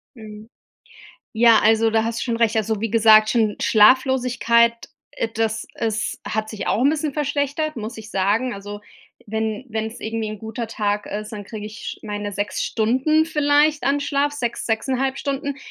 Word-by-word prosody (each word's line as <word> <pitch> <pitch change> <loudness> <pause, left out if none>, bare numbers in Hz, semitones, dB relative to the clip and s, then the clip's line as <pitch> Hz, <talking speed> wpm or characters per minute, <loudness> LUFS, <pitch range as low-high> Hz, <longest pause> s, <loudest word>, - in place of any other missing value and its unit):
Mhm. 215 -1 -11 0.8
Ja, 230 0 +5
also 225 +1 +3
da 220 0 +1
hast 230 0 -3
du - - -3
schon 235 -2 -1
recht. 230 -1 +1
Also 220 -1 -1
wie 225 0 -2
gesagt, 215 -1 +6
schon 220 -3 +1
Schlaflosigkeit, 235 0 +4 0.4
äh, 230 - -2
das 220 0 -1
ist 220 -1 -2
hat 215 0 -2
sich 215 -2 -6
auch 230 - +1
'n 275 - +5
bisschen 305 -1 -2
verschlechtert, 290 +1 -2
muss 225 +1 -6
ich 220 0 -10
sagen. 205 +6 0
Also 205 +1 -8 0.5
wenn 220 +2 -3
wenn's 220 +1 -4
irgendwie 225 0 -3
'n 215 0 -7
guter 225 +3 -5
Tag 210 -1 -2
ist, 210 +2 -6
dann 205 -2 -7
kriege 210 +1 -7
ich 215 +1 -8
meine 205 -1 -4
6 205 +1 -3
Stunden 260 +8 +1
vielleicht 300 -1 +2
an 280 +1 +2
Schlaf. 285 0 0
6, 240 -5 -3
6,5 265 +4 -1
Stunden. 280 0 -3
225 Hz, 170 wpm, -21 LUFS, 215-265 Hz, 0.8 s, gesagt